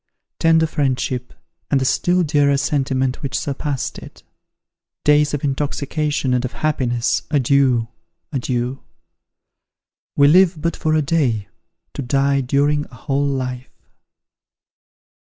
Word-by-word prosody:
tender 165 0 +4
friendship, 130 -4 -2 0.4
and 140 - +2
the 130 - -1
still 175 +6 +2
dearer 145 -2 +2
sentiment 135 -2 -1
which 135 -2 -2
surpassed 140 -1 -3
it! - - -14 0.8
days 150 0 +4
of 145 - -3
intoxication 145 0 -1
and 125 0 +1
of 130 -1 -4
happiness 120 -3 0
adeiu! 135 -4 +2 0.5
adieu! 125 0 -2 1.3
We 140 - +5
live 175 +1 +5
but 165 +1 -1
for 155 0 0
a 155 - +2
day, 130 -9 0 0.4
to - - -4
die 140 +1 +1
during 145 +3 +1
a 125 - -16
whole 140 +3 -1
life!" 130 -2 -5
140 Hz, 120 wpm, -20 LUFS, 130-150 Hz, 1.3 s, We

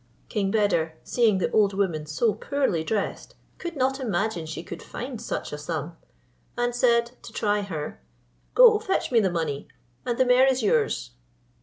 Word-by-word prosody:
King 200 -4 0
Beder, 195 -7 +1
seeing 225 -5 +2
the 185 - -1
old 200 -2 +3
woman 170 -6 -1
so 205 +9 +1
poorly 220 - -1
dressed, 200 +5 -3 0.2
could 345 -2 -5
not 270 0 0
imagine 205 -7 -1
she 160 +1 -6
could 170 0 -8
find 245 -2 -6
such 230 - -4
a 150 - -5
sum; 155 +1 -4 0.6
and 240 0 0
said, 235 -1 +3
to - - -11
try 210 -2 0
her, 155 - -5 0.5
"Go, 470 -4 +8
fetch 410 -9 -1
me 235 - +5
the 195 -4 +2
money, 160 -5 -3 0.4
and 240 -2 -2
the 260 - +4
mare 250 +1 +5
is 260 -2 +1
yours." - - +1
210 Hz, 170 wpm, -25 LUFS, 165-245 Hz, 0.6 s, Go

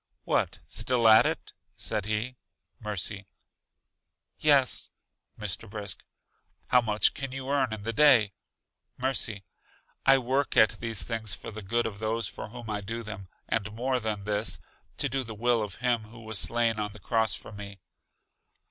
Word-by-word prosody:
What, - - 0
still 120 -3 +2
at 110 0 +8
it? - - -4 0.2
said 105 -2 -2
he. 110 +4 -1 0.4
Mercy: 100 -1 -3 1.1
Yes. - - +4 0.5
Mr. 105 +1 -3
Brisk: 100 -3 -5 0.7
How 125 - +6
much 110 -2 +3
can 135 -2 -4
you 135 0 -5
earn 135 -4 +2
in 110 -2 -5
the 115 +2 -2
day. 115 -7 +6 0.6
Mercy: 120 -6 -1 0.6
I 135 0 +7
work 135 +2 0
at 110 - +5
these 115 -2 +1
things 110 -4 -2
for - - -8
the 110 0 -7
good 115 +4 0
of 105 -3 -4
those 110 0 -1
for 105 - -7
whom 120 0 -9
I 105 -1 -2
do 115 +4 -5
them; 105 -3 -7 0.2
and 110 -2 -1
more 125 +3 0
than 105 -3 -3
this, 105 +1 0 0.4
to - - +1
do 135 +1 -1
the 110 -2 -7
will 120 +1 +2
of 105 -3 -4
Him 120 -2 0
who 115 +2 -13
was 110 -2 -1
slain 115 -2 +2
on 105 -1 -2
the 110 - -12
cross 110 +3 +1
for - - -9
me. 100 -1 -9
110 Hz, 165 wpm, -29 LUFS, 105-120 Hz, 1.1 s, at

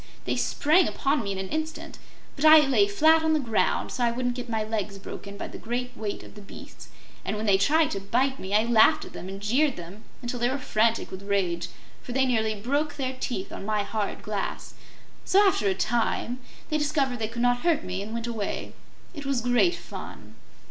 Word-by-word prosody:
They - - 0
sprang 320 +4 +3
upon 280 -2 0
me 200 - -3
in 195 - -3
an 190 0 -4
instant; 315 0 -4 0.4
but 275 - -5
I 310 0 +9
lay 225 -7 +4
flat 315 +10 +4
on 320 0 +2
the 310 - +3
ground, 230 -6 0
so 250 - -2
I 240 - +4
wouldn't 245 +1 -1
get 245 -1 -7
my 220 -1 0
legs 210 -2 -3
broken 200 +1 -9
by - - -5
the - - -9
great 245 +2 -4
weight 210 -2 -4
of - - -13
the 210 - -11
beasts, 200 - -12 0.4
and - - -2
when 215 - -3
they 195 -2 +4
tried 310 +10 +3
to 195 - -2
bite 255 +7 0
me 190 - -6
I 215 - +5
laughed 230 -1 +4
at - - -12
them 185 - -7
and 195 0 -6
jeered 255 +7 +2
them 180 +5 -10 0.2
until 245 0 -3
they 240 +1 +2
were 265 - -1
frantic 230 -3 +1
with 190 - -7
rage, 185 -4 -1 0.3
for 245 - -7
they 265 +1 +3
nearly 220 -4 +1
broke 285 +8 -1
their 265 -2 -3
teeth 195 -6 -4
on - - -7
my 210 0 0
hard 205 0 -3
glass. 205 -2 -4 0.5
So, 400 +2 +5
after 225 - +2
a 190 - +2
time, 240 +3 0 0.3
they 305 - +1
discovered 285 -4 0
they 220 - -1
could 235 +2 -3
not 245 0 +3
hurt 330 +1 +1
me, 185 +1 -4
and 210 +2 -7
went 230 0 -3
away. 225 -4 -4 0.4
It 290 -4 -7
was 275 -3 +1
great 245 +9 +3
fun." - - -10
235 Hz, 220 wpm, -26 LUFS, 205-275 Hz, 0.5 s, I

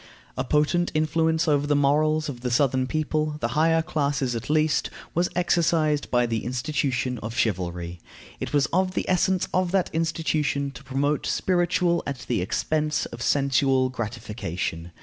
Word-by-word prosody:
A 130 - -1
potent 150 +6 +1
influence 160 +1 +1
over 145 -1 +2
the 145 - +2
morals 150 +2 +2
of 125 -5 -6
the 125 - -2
southern 130 0 +2
people, 155 0 -1
the 115 - -1
higher 165 +4 +2
classes 140 -5 -1
at 115 +3 -5
least, 155 0 +2 0.2
was 175 +2 +1
exercised 165 -4 +1
by 120 -1 +3
the 115 -2 -2
institution 125 -1 -1
of 110 +3 -6
chivalry. 90 -4 -2 0.4
It - - -4
was 145 -2 +3
of 185 +1 +1
the - - -1
essence 185 0 +2
of 185 -1 +2
that 190 -2 +1
institution 155 -3 0
to 140 - -12
promote 140 +2 -1
spiritual 175 -1 +1
at 140 -3 -5
the 120 -7 0
expense 150 - 0
of 120 - -8
sensual 135 -1 +2
gratification. 105 -8 -4
145 Hz, 155 wpm, -25 LUFS, 125-160 Hz, 0.4 s, by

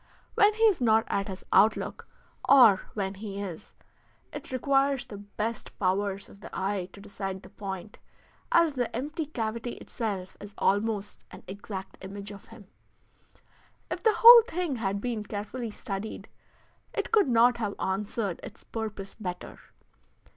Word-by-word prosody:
When 415 +1 +4
he 445 - 0
is 420 -10 +4
not 225 -2 +4
at 195 0 -1
his 190 -2 -7
outlook, 215 +1 +3 0.4
or 240 -8 +8
when 195 -2 -2
he 200 0 -7
is, 185 -5 -7 0.6
it - - -8
requires 275 +1 +1
the 205 - -9
best 215 +2 -5
powers 195 +1 0
of 195 - -16
the - - -10
eye 190 -1 -2
to - - -12
decide 195 -2 -6
the 185 - -14
point, 195 -1 -7 0.5
as 335 -3 +4
the 245 -4 -2
empty 295 +5 -3
cavity 235 -3 -3
itself 200 -6 -5
is 205 0 -11
almost 205 0 0
an - - -12
exact 195 -1 -8
image 200 +1 -7
of 200 -1 -12
him. 225 -3 -14 1.3
If - - -3
the 445 -1 +3
whole 470 +1 +11
thing 345 - -2
had 200 -2 -2
been 235 -3 -2
carefully 215 +4 -5
studied 210 -1 -6 0.7
it - - -2
could 430 -8 +4
not 240 0 +4
have 210 -3 -3
answered 200 0 -2
its 210 - -11
purpose 215 -3 -6
better. 180 -4 -7
210 Hz, 150 wpm, -28 LUFS, 195-245 Hz, 1.3 s, whole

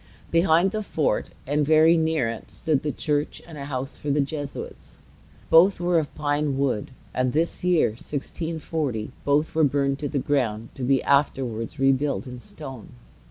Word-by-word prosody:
Behind 170 +2 +4
the 215 - -2
fort, 160 -7 -1 0.2
and 145 +2 +1
very 160 +3 +5
near 160 -6 +1
it, 115 0 -6
stood 155 -4 0
the 150 - -1
church 145 +2 -1
and 165 - -11
a 140 -2 -6
house 135 0 -4
for 145 - -4
the 145 +1 +2
Jesuits. 145 0 -5 0.5
Both 180 +4 +6
were 175 -1 +2
of 150 - -5
pine 145 -2 0
wood; 135 -6 0 0.2
and 125 -1 0
this 165 +4 0
year, 180 -7 +3
1640, 145 0 -3
both 145 +2 +1
were 160 - +3
burned 140 -1 +1
to 145 - -2
the 145 - -2
ground, 115 -6 0
to - - -10
be 130 +1 +2
afterwards 135 -3 0
rebuilt 135 +1 +1
in 125 -1 -8
stone. 135 - -9
145 Hz, 165 wpm, -25 LUFS, 135-160 Hz, 0.5 s, Both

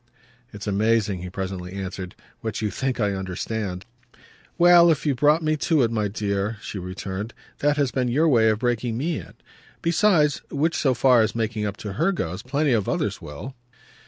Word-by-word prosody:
"It's 105 0 -8
amazing," 105 -1 +1
he 90 - -6
presently 95 -1 -5
answered, 95 -1 -6 0.2
"what 110 -2 -4
you 105 -2 -1
think 130 +4 -2
I 105 -2 +2
understand." 95 +1 -4 0.7
"Well, 175 0 +7
if 160 -2 +1
you've 140 -4 +1
brought 150 +4 +4
me 155 0 +2
to 155 -2 +2
it, 115 - +1
my 105 -2 0
dear," 100 +1 -2
she 100 - -6
returned, 95 +4 -5 0.2
"that 145 +1 +2
has 140 -3 +1
been 130 -2 0
your 145 +7 +2
way 115 -6 +4
of 110 - +1
breaking 120 -1 -1
ME 155 +4 -1
in. - - -12 0.5
Besides 170 -3 +3
which, 160 +4 0
so 130 -3 +2
far 125 -1 +5
as 110 +1 0
making 110 -2 -1
up 100 0 -5
to 105 -2 -6
her 165 - +1
goes, 90 - -3
plenty 140 +2 0
of 105 -4 0
others - - -1
will." 75 - -8
115 Hz, 190 wpm, -24 LUFS, 100-145 Hz, 0.7 s, Well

